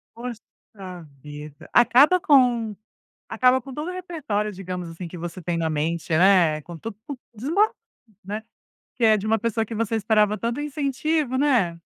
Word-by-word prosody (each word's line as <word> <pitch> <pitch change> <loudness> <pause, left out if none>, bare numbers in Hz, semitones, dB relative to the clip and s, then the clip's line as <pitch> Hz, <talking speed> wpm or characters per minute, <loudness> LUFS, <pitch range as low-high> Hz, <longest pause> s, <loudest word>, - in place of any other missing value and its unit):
Poxa 235 -2 -7 0.8
vida. 150 0 -10
Acaba 255 +9 +6
com 245 -8 +3 0.5
acaba 255 +3 +3
com 270 +2 -10
todo 300 +5 -4
o 365 - -3
repertório, 300 - -3
digamos 180 -2 -6
assim, 165 +1 -7
que 175 - -9
você 175 +2 -6
tem 170 +1 -2
na 165 -1 0
mente, 160 +2 -2
né, 175 -4 +4
com 170 +1 -9
tudo 225 +1 -7 0.4
desmon 320 - +2 0.6
né? 210 +3 -5 0.5
Que 245 - -1
é 220 -1 +6
de 210 0 -4
uma 225 +1 +2
pessoa 225 0 -1
que 225 +1 -7
você 225 0 -1
esperava 210 0 +2
tanto 235 +4 -2
incentivo, 295 -1 -1
né? 235 -12 +1
220 Hz, 160 wpm, -24 LUFS, 180-260 Hz, 0.8 s, Acaba